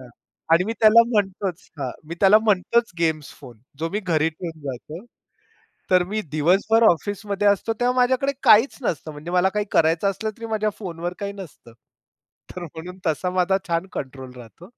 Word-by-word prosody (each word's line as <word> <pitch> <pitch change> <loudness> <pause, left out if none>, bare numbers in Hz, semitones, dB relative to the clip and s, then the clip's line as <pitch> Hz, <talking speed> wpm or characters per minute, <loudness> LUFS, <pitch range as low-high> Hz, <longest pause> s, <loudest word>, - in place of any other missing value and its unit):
हां. 130 - -13 0.4
आणि 170 +2 +5
मी 220 - -2
त्याला 225 +1 +7
म्हणतोच 195 -4 -2
हां. 130 -3 -3 0.2
मी 170 - -5
त्याला 200 +2 +7
म्हणतोच 220 +2 +1
गेम्स 160 -4 -1
फोन, 125 -5 -13 0.2
जो 165 - -2
मी 210 - -2
घरी 160 -5 +1
ठेवून 165 0 -8
जातो. 150 - -9 0.9
तर 180 -1 +5
मी 215 +1 -1
दिवसभर 190 +9 +3
ऑफिसमध्ये 205 +3 -1
असतो, 205 +3 +2
तेव्हा 245 +1 +1
माझ्याकडे 260 +2 +2
काहीच 225 +6 +5
नसतं, 165 - -3
म्हणजे 155 +4 -8
मला 180 +1 +3
काही 210 0 -1
करायचं 165 +4 +2
असलं 220 +3 -3
तरी 230 - -7
माझ्या 215 -1 0
फोनवर 175 -3 -5
काही 200 0 -4
नसतं. 170 - -12 0.8
तर 180 - -6
म्हणून 175 +3 -9
तसा 160 +3 0
माझा 190 +2 +2
छान 170 +2 -1
कंट्रोल 130 -2 -7
राहतो. 125 +9 -13
180 Hz, 170 wpm, -23 LUFS, 160-210 Hz, 0.9 s, त्याला